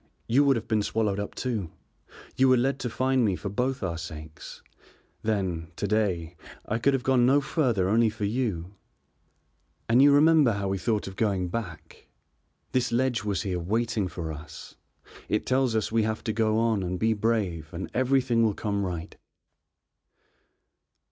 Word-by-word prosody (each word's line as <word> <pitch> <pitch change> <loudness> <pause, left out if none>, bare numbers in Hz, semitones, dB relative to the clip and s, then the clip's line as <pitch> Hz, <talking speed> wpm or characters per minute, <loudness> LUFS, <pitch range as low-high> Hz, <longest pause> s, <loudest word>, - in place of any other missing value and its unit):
You 130 +5 +3
would 140 -1 +4
have 115 - -4
been 110 -1 +1
swallowed 105 -1 -1
up 100 - -5
too; 110 -9 -3 0.7
you 130 0 +4
were 130 - +5
led 135 +3 0
to 125 - -3
find 130 +2 +1
me 100 -4 +2
for 100 - -5
both 125 +4 -2
our 85 -3 -2
sakes. 80 -2 -9 0.6
Then, 95 -7 -2
to - - -3
day, 95 -6 0 0.3
I 115 - -2
could 140 +3 +3
have 130 - -3
gone 125 -2 +3
no 140 +2 +5
further 130 - 0
only 110 +3 +3
for 110 -1 -4
you, 100 -6 -2 1.1
and 120 +3 +5
you 145 +1 +7
remember 150 -3 +5
how 100 -1 -2
we 95 0 -1
thought 105 +2 -1
of 95 - -8
going 95 -4 0
back? 90 -6 -7 0.6
This 125 -1 0
ledge 120 -1 +1
was 105 -1 -1
here 95 -4 -2
waiting 110 +3 -1
for 80 -3 -5
us. 75 +2 -10 0.6
It 105 - 0
tells 130 -3 +1
us 110 -1 0
we 115 0 +2
have 110 0 -2
to 110 - -2
go 110 -1 +1
on 115 -3 +1
and 90 0 -3
be 110 +3 +2
brave 100 -8 -1
and 90 +2 -5
everything 130 -2 +2
will 110 -3 +2
come 100 -2 -2
right." 85 -3 -5
110 Hz, 175 wpm, -27 LUFS, 95-125 Hz, 1.1 s, you